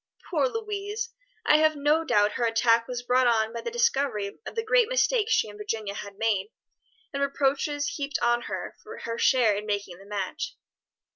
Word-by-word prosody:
Poor 295 -6 +2
Louise! 425 - -4 0.3
I 300 - +6
have 310 0 +3
no 295 +3 +2
doubt 210 -9 +3
her 235 - -1
attack 230 0 +3
was 245 -1 -4
brought 250 +1 +3
on 225 -1 +2
by 235 - -4
the - - -3
discovery 280 - 0
of - - -7
the 455 0 -2
great 485 0 +4
mistake - - +2
she - - +3
and 210 0 -11
Virginia 210 -1 -3
had 200 -1 -8
made, 205 -3 +1 0.7
and 280 - -2
reproaches 280 +1 0
heaped 285 -1 -2
on 240 0 +2
her - - -5
for 445 +2 -10
her 230 0 -4
share 240 -6 +4
in 210 +1 -5
making 200 -4 -3
the 195 - -15
match." 210 - -4
255 Hz, 190 wpm, -27 LUFS, 215-325 Hz, 0.7 s, I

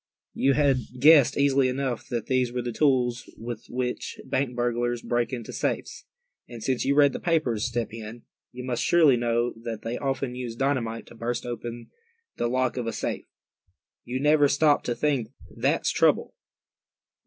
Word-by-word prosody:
You 140 - +2
had 140 -2 +3 0.2
guessed 145 -1 +6
easily 140 -1 +3
enough 130 -2 -3
that 120 -3 -3
these 130 -2 +1
were 125 0 -3
the 120 - -3
tools 125 -2 +1
with 115 0 -7
which 125 0 -3
bank 130 -2 -1
burglars 120 0 -1
break 120 -1 0
into 120 -3 -6
safes. - - -3 0.4
And 115 -2 -9
since 130 +1 0
you 140 - +1
read 145 -2 +5
the - - -4
papers, 150 -11 0
Step 120 -2 -2
Hen, 115 +1 -8 0.3
you 125 +1 -8
must 125 -2 -2
surely 160 -6 +5
know 120 0 0
that 115 -2 -6
they 115 +1 -3
often 135 -2 -2
use 125 -2 -5
dynamite 120 -4 -1
to - - -15
burst 120 +1 -3
open 120 0 -6 0.5
the 120 - 0
lock 130 +1 0
of 120 -2 -2
a 115 - -2
safe. - - -4 0.8
You 125 +2 -3
never 150 +1 +4
stopped 145 +1 +2
to 120 - 0
think, 140 -6 0 0.3
that's - - +1
the - - -4
trouble. - - +3
125 Hz, 175 wpm, -26 LUFS, 120-135 Hz, 0.8 s, guessed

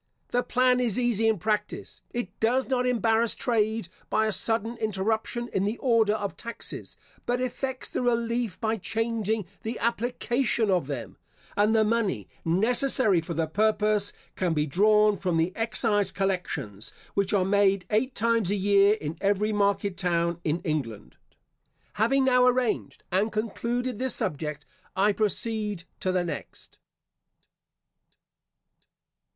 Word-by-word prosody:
The 245 - +1
plan 250 0 +2
is 240 -3 +2
easy 235 -3 +2
in 220 -1 +2
practice. 210 +2 -3
It 240 -6 -4
does 250 +4 +1
not 250 -1 +1
embarrass 230 -1 +2
trade 220 -4 0 0.2
by 220 - +2
a 215 - 0
sudden 225 +3 +1
interruption 220 +2 -1
in 190 - -1
the 210 +4 -1
order 225 -4 +2
of 205 -2 -4
taxes, 235 0 -6 0.3
but 245 +1 +1
effects 255 +1 -3
the - - -3
relief 235 -4 0
by 225 0 0
changing 220 0 -1 0.2
the 225 +2 -4
application 235 -1 0
of 180 -7 +1
them; 120 -8 -6 0.4
and 210 +2 +3
the 220 - +5
money 210 - 0 0.2
necessary 215 +2 +2
for 165 +1 -6
the 165 +1 +1
purpose 210 +3 +1 0.2
can 175 -3 0
be 150 0 +1
drawn 210 +6 +4
from 180 -3 -1
the 165 +3 +1
excise 215 -3 +1
collections, 155 - -3 0.2
which 200 0 0
are 195 -3 +2
made 195 -1 +2
eight 250 +5 +1
times 230 -3 +1
a 205 - +1
year 200 +1 +4
in 160 -5 -6
every 205 +2 +1
market 200 -2 +1
town 170 -2 0
in 160 +2 -1
England. 115 - -4 0.9
Having 270 +4 +3
now 250 -1 +5
arranged 250 -3 0
and 200 +5 +1
concluded 235 +2 -2
this 260 -2 +2
subject, 150 0 -3 0.3
I 200 +3 +3
proceed 210 -2 0 0.2
to 185 - 0
the 180 -1 +1
next. 170 - -7
215 Hz, 140 wpm, -27 LUFS, 190-235 Hz, 0.9 s, the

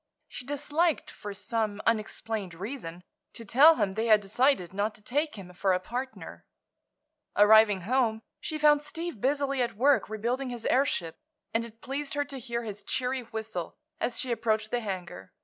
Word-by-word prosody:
She 245 - -8
disliked, 295 +3 0
for 205 - -8
some 215 0 -2
unexplained 215 -4 -1
reason, 180 -3 -6 0.3
to 230 - -8
tell 290 +10 +7
him 200 -10 0
they 220 +4 -1
had 215 -2 +7
decided 205 - +1
not 205 +2 -1
to - - -14
take 295 +7 -1
him 185 -3 -10
for 190 +1 +1
a 180 - +1
partner. 250 +7 -6 0.9
Arriving 210 -1 +6
home 225 +1 +1 0.2
she 310 - -3
found 295 -1 +5
Steve 325 - -6
busily 275 0 +1
at 235 -4 -1
work 260 -4 +3
rebuilding 240 +5 -2
his 240 -2 -6
airship, 250 - +1 0.4
and 225 - +1
it 225 0 -14
pleased 280 +2 -4
her 290 0 0
to 275 -2 -8
hear 235 -1 -3
his 210 -2 -6
cheery 255 0 -1
whistle 220 -7 -5 0.2
as 235 -1 -1
she 255 - -2
approached 220 -2 0
the 245 - +1
hangar. 180 - -6
230 Hz, 170 wpm, -28 LUFS, 205-270 Hz, 0.9 s, tell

